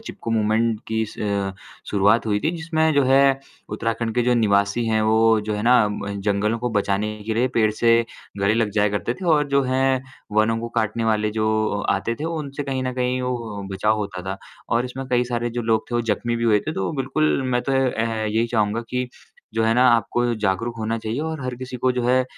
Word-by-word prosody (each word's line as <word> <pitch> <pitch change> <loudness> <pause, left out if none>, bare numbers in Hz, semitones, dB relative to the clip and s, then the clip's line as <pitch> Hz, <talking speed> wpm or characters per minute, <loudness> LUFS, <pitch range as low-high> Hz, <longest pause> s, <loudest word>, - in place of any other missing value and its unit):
चिपकू 115 - -7
movement 110 0 +1
की 110 0 0
स - - -13
अ, 100 -2 -1 0.4
शुरुआत 105 +3 +3
हुई 105 -1 +1
थी 155 - +1
जिसमें 160 -1 +1
जो 140 - +4
है 135 +1 +5 0.5
उत्तराखंड 115 +1 -2
के 120 - +2
जो 125 0 +2
निवासी 100 0 +2
हैं, 110 -1 +2
वो 110 0 +4
जो 105 0 -3
है 105 - -3
ना 125 +2 +5
अम, 105 0 -3 0.2
जंगलों 105 +3 0
को 120 +1 -2
बचाने 100 +2 -1
के 110 - -1
लिए 125 +3 +2
पेड़ 110 -1 +4
से 115 +1 +3 0.5
गले 100 +2 +3
लग 110 -2 +1
जाया 105 0 +4
करते 120 - -2
थे। 185 - -9
और 150 -1 +1
जो 140 0 +3
हैं 130 0 +1 0.3
वनों 115 +1 +3
को 115 - -4
काटने 110 +1 -1
वाले 105 -1 +1
जो 110 0 0 0.4
अ, - - +4
आते 110 +4 -2
थे, - - -2
वो 165 -1 -2
उनसे 145 -1 -5
कहीं 135 -2 -2
न 130 0 -2
कहीं 125 0 0
वो 115 -5 -4
अ, - - -7
बचाव 105 +3 +1
होता 100 -3 -4
था। 95 - -5 0.3
और 120 +2 +1
इसमें 130 +1 -6
कई 125 0 +3
सारे 120 -1 -2
जो - - -1
लोग 110 -1 +1
थे - - -3
वो 120 - +2
जख्मी 120 +3 -2
भी 115 - -2
हुए 105 -3 +4
थे, 155 - -4
तो 95 - -2
बिल्कुल 140 +1 +1
मैं 125 0 +1
तो 135 - -2
ए 135 0 +3
ए 115 -2 -2
यही 110 +2 +1
चाहूँगा 110 -1 0
कि, 125 0 -2 0.5
जो 115 - +1
है 115 - +3
ना 125 +1 +5
आपको 120 +1 +1 0.2
जागरूक 115 +4 -1
होना 110 +1 -1
चाहिए 110 +5 -3
और 160 -2 -3
हर 125 -1 -3
किसी 130 0 -6
को 130 +1 +1
जो 125 -1 -2
है 130 +1 +3
115 Hz, 235 wpm, -22 LUFS, 110-125 Hz, 0.5 s, है